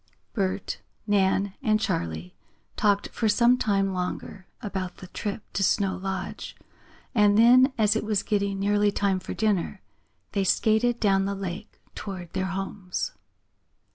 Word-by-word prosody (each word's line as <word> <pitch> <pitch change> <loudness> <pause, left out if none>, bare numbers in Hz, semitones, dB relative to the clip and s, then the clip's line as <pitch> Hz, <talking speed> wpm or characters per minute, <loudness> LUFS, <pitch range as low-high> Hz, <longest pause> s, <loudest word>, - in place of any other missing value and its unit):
Bert, 195 -2 -2 0.2
Nan 195 -1 +2
and 215 0 +2
Charley 90 - -2 0.4
talked 205 -1 +2
for 225 - 0
some 235 +3 +5
time 195 -5 +1
longer 185 +1 -4
about 190 -5 -4
the - - -10
trip 205 +3 -5
to - - -1
Snow 195 0 +2
Lodge, 190 -1 -5 0.6
and 210 -2 +4
then, 250 +4 +7
as 215 -1 +3
it 220 - 0
was 210 -2 0
getting 200 -1 0
nearly 205 +1 +2
time 200 -2 +1
for 185 - -6
dinner, 205 -3 0 0.5
they 200 -2 0
skated 220 +5 +2
down 195 -2 +3
the 200 0 -2
lake 195 +2 -6
toward 185 -4 -7
their 190 0 -1
homes. 195 - -3
200 Hz, 140 wpm, -26 LUFS, 190-215 Hz, 0.6 s, then